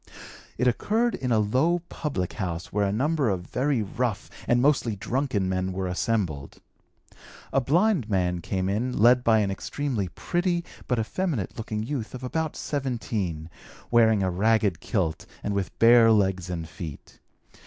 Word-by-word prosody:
It 125 - +2
occurred 220 - +1
in 125 -2 -2
a 115 - +4
low 135 +12 +2
public 115 - -3
house 90 -5 -4
where 100 0 +2
a - - 0
number 140 +4 +1
of 90 -3 -2
very 130 0 0
rough 115 +2 -3 0.2
and 120 - +3
mostly 130 -5 +2
drunken 115 -2 -1
men 95 0 -1
were 95 0 -2
assembled. 90 -6 -2 0.9
A 135 - +3
blind 165 - +2
man 90 -3 0
came 95 +2 -2
in 115 +6 -1
led 120 +3 +5
by 110 -2 +4
an 100 -1 0
extremely 120 0 -2
pretty 175 - -1 0.2
but 125 - +1
effeminate 125 - -2
looking 110 -1 -4
youth 125 -2 -4
of 130 - -8
about 160 +4 -2
17, 110 - -3 0.4
wearing 110 -4 +4
a 95 - +1
ragged 105 -1 +2
kilt 90 -6 -2 0.2
and 105 - -1
with 100 -4 -3
bare 115 0 +7
legs 95 -4 +1
and 85 -2 -4
feet. 80 -2 -9
110 Hz, 155 wpm, -26 LUFS, 95-130 Hz, 0.9 s, bare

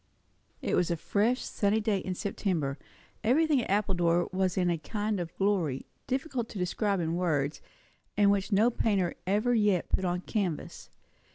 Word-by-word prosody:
It - - -1
was 180 - +2
a 170 - 0
fresh, 220 +9 +1
sunny 205 +1 +1
day 210 -2 +1
in 185 -1 -4
September; 165 -8 -2 0.4
everything 285 +4 +3
at - - -6
Appledore 175 -4 +2
was 185 -1 0
in 180 -2 +2
a 170 - -1
kind 210 +4 -2
of 170 -1 -6
glory, 180 -10 0 0.2
difficult 260 -3 -2
to - - -8
describe 195 +2 0
in 165 -1 -1
words, 150 -5 0 0.6
and 200 -1 +5
which 200 +1 0
no 215 +5 +4
painter 200 -6 +1
ever 210 +6 +2
yet 210 -6 +2
put 190 - 0
on 180 -1 0
canvas. 185 -7 -3
195 Hz, 165 wpm, -29 LUFS, 175-215 Hz, 0.6 s, and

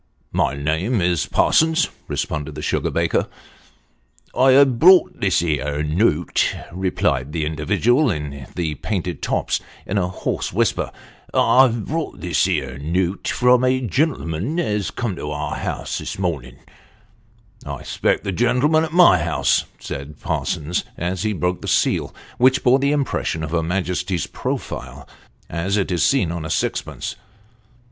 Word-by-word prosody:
" - - -42
My 70 - -1
name 80 - 0
is 85 -3 +1
Parsons," 160 +1 +3 0.2
responded 75 0 -3
the - - -6
sugar - - 0
baker. - - 0 0.6
" - - -33
I've 130 -1 +5
brought 185 +2 +6
this 95 -4 +2
here 75 -3 -1
note," 85 +1 +1 0.2
replied 75 -7 -1
the 80 -2 -1
individual 110 - +2
in 75 - -4
the 80 -4 -1
painted 90 0 -3
tops, - - 0 0.3
in 100 - 0
a 90 - 0
hoarse 95 - -3
whisper: 100 -1 0 0.3
" - - -26
I've 120 -4 +4
brought 160 +1 -3
this 90 -1 +1
here 65 +2 -2
note 90 +5 -1
from 125 0 +3
a 130 0 +3
gen'lm'n 130 - -1
as 105 - -1
come 115 -6 -3
to 75 - -5
our 75 0 -3
house - - -3
this - - -5
mornin'." 80 -10 -3 0.6
" - - -28
I - - -4
expected - - 0
the 100 - -2
gentleman 125 - +2
at 160 -1 -4
my 175 - +7
house," 75 - +1
said 70 +1 -7
Parsons, 80 +4 -2
as 90 +2 -2
he 110 - 0
broke 90 -1 -1
the - - -6
seal, - - +1 0.3
which 130 +1 +4
bore 130 +2 +5
the 140 +1 +1
impression 135 - -1
of 80 - -4
her 85 -1 +1
Majesty's 90 0 -1
profile - - -5 0.4
as 95 +5 -1
it 95 -2 -1
is 85 - 0
seen 125 -11 +2
on 85 -2 -4
a 80 - -5
sixpence. - - -2
90 Hz, 155 wpm, -21 LUFS, 80-125 Hz, 0.6 s, my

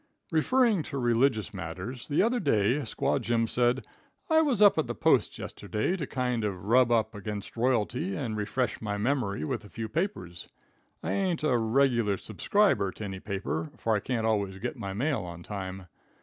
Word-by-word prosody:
Referring 220 +5 +3
to 150 -2 -5
religious 120 -3 +2
matters, 95 +7 -6
the 150 +5 +2
other 240 +3 +2
day, 115 - +2
Squaw 125 -7 -1
Jim 115 -1 +1
said: 120 +2 +1 0.5
"I 320 0 +6
was 275 -9 +1
up 205 -5 +6
at 160 - 0
the - - -3
Post - - +2
yesterday 110 - -2
to 155 -7 -4
kind 125 -3 -1
of 100 -3 -3
rub 120 +2 +4
up 110 -2 +2
against 105 -1 -6
royalty, 125 - 0
and 120 -7 -3
refresh 105 +2 -1
my 105 -2 -2
memory 105 - 0
with 75 - -3
a 105 - -13
few 115 +2 -5
papers. 110 - -3 0.5
I - - -2
ain't 185 -5 0
a 150 -5 +3
regular 115 -3 +2
subscriber 110 - +1
to - - -8
any 95 -2 -5
paper, 95 -6 -3
for 115 -1 +1
I - - +1
can't 115 +1 -2
always 100 -4 0
get - - -4
my 100 - -5
mail 135 +5 0
on 85 -1 -8
time. 95 -1 -6
115 Hz, 180 wpm, -28 LUFS, 100-140 Hz, 0.5 s, I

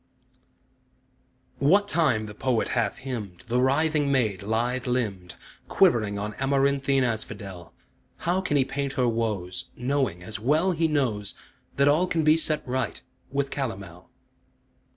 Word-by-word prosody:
What 195 +9 +4
time 140 - +2
the 105 - -8
poet 125 +1 0
hath 115 -5 0
hymned 105 -9 -5
The 120 +1 +1
writhing 145 +2 +2
maid, 110 -8 +1
lithe 120 +5 -1
limbed, 105 -8 -2 0.3
Quivering 105 -3 +3
on 105 +1 -4
amaranthine 140 0 +2
asphodel, 100 -6 -4 0.5
How 180 +3 0
can 150 -6 0
he 135 - +3
paint 140 0 -3
her 125 -2 +1
woes, 110 -6 -2
Knowing, 125 -8 -1
as 105 +3 -3
well 155 - +2
he 165 -1 +1
knows, 125 -10 -1 0.4
That 140 0 +3
all 155 +6 +4
can 165 -3 0
be 155 +1 +6
set 155 -3 +1
right 130 +1 -2 0.3
with 140 0 -1
calomel? 95 - -5
130 Hz, 135 wpm, -26 LUFS, 105-140 Hz, 0.5 s, be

